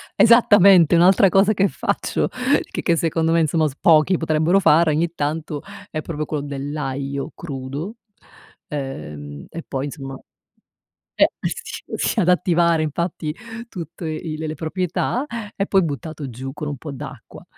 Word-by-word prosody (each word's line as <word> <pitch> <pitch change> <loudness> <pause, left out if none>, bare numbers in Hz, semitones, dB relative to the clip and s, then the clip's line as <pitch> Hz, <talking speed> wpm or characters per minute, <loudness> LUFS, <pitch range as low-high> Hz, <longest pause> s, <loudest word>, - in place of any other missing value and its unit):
Esattamente, 200 -7 +6
un'altra 185 +3 +6
cosa 195 +3 +4
che 195 0 +3
faccio, - - -1 0.4
che - - -3
che 170 - +3
secondo 165 0 0
me 170 - +4
insomma 155 0 +2
s 135 - -7
pochi 165 +2 +5
potrebbero 160 +3 +2
fare 165 -3 +4
ogni 160 +2 0
tanto, 150 -1 -3 0.3
è 155 - -3
proprio 155 -1 -4
quello 150 -1 -3
dell'aglio 140 -1 -4
crudo, 145 - -6 0.7
uhm, 75 - -6
e 165 - -7
poi 135 0 -3
insomma 135 -2 -7 1.0
eh - - +5
s - - -5
sì, - - 0
ad 180 -3 +2
attivare 170 -2 +3
infatti 155 0 -3 0.3
tutte 170 -5 -7
i 155 0 -4
l 160 - -4
le 155 - -3
proprietà, 180 - -2 0.3
e 195 - 0
poi 195 -2 +3
buttato 150 -1 -5
giù 130 +3 -7
con 150 +1 -5
un 145 -1 -4
po' 150 +3 -7
d'acqua, 135 - -10
155 Hz, 150 wpm, -21 LUFS, 145-175 Hz, 1.0 s, Esattamente